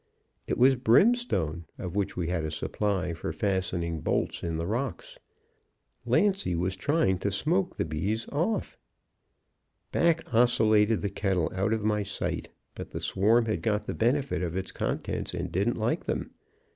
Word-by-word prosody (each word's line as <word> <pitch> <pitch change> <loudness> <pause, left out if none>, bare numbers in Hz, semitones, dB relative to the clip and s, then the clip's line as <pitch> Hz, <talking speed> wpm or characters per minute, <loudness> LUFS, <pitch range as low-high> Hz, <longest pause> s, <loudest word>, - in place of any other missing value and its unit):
It - - -1
was 130 +2 +6
brimstone, 120 - +2
of 90 -1 -6
which 100 -1 -1
we 85 -2 -1
had 85 -3 -1
a 80 - -2
supply 90 +3 -1
for 80 -1 -4
fastening 90 -3 -1
bolts - - -1
in 85 -1 -2
the 85 - -2
rocks. 140 - -4 0.9
Lancy 195 - +2
was 90 +2 0
trying 95 - +1
to 100 - 0
smoke 170 - 0
the - - -1
bees 95 +9 -2
off. 170 +10 -1 1.1
"Back 165 -5 +1
oscillated 110 -2 +4
the 100 - -2
kettle 95 -4 0
out 95 +3 0
of 110 -1 0
my 105 -1 +1
sight. 100 0 -3 0.2
But - - -8
the - - -5
swarm 110 +5 +3
had 110 -1 -1
got 105 -2 0
the - - -3
benefit 120 - +1
of 90 0 -2
its 95 - -4
contents - - -3
and - - -4
didn't 100 +6 0
like 110 +2 -1
them. - - -3
105 Hz, 160 wpm, -28 LUFS, 90-120 Hz, 1.1 s, was